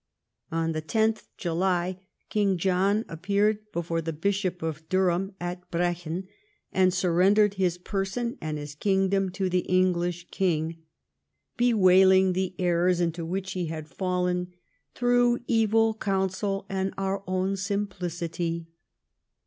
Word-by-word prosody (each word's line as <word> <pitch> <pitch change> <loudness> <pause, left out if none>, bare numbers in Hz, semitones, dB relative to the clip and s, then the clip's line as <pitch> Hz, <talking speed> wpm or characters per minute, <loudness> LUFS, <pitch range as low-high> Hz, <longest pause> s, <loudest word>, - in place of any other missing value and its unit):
On 165 0 0
10th 220 +8 0
July 180 +1 0 0.3
King 200 -3 +2
John 195 +4 +1
appeared 200 +5 +1
before 165 0 -2
the 165 0 -3
bishop 185 +2 -1
of 160 0 -5
Durham 190 +1 +1
at 180 +1 -5
Brechin 175 +1 -2 0.5
and 185 -1 +4
surrendered 190 +4 +3
his 185 -3 0
person 195 +6 -3
and 155 -1 -3
his 145 -1 -7
kingdom 195 +3 +1
to 190 0 -1
the 180 0 +1
English 175 -1 0
king, 165 -3 -1 0.7
bewailing 190 -5 +5
the 185 0 -2
errors 175 0 +2
into 170 -1 -1
which 190 +3 -3
he 180 -2 -2
had 155 -1 -6
fallen 180 +2 -1 0.2
" - - -45
through 245 0 +3
e\T:l 225 -1 +3
counsel 195 -1 -1
and 190 0 -2
our 195 0 -2
own 185 +1 0
simplicity." 175 -4 -3
185 Hz, 125 wpm, -27 LUFS, 175-195 Hz, 0.7 s, bewailing